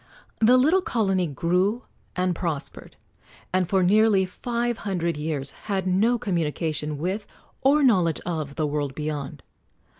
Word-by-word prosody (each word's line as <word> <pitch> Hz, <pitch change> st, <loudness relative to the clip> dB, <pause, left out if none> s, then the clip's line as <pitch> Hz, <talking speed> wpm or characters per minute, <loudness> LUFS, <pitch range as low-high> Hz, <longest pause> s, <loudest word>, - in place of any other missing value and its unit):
The 240 Hz, +3 st, +6 dB
little 315 Hz, +9 st, +4 dB
colony 195 Hz, -, 0 dB
grew 180 Hz, -, 0 dB, 0.3 s
and 180 Hz, 0 st, +1 dB
prospered, 165 Hz, -5 st, -5 dB, 0.6 s
and 185 Hz, -2 st, +1 dB
for 190 Hz, -2 st, +3 dB
nearly 205 Hz, 0 st, +4 dB
five 235 Hz, +4 st, -3 dB
hundred 175 Hz, -4 st, -2 dB
years 150 Hz, -2 st, -2 dB, 0.2 s
had 190 Hz, -2 st, 0 dB
no 205 Hz, +7 st, +2 dB
communication 160 Hz, -7 st, -2 dB
with, 190 Hz, +7 st, -3 dB, 0.3 s
or 285 Hz, +2 st, +4 dB
knowledge 180 Hz, -, +3 dB
of, 155 Hz, -5 st, -3 dB
the 155 Hz, -, 0 dB
world 145 Hz, -2 st, -2 dB
beyond. 150 Hz, -2 st, -5 dB
180 Hz, 130 wpm, -25 LUFS, 155-215 Hz, 0.6 s, The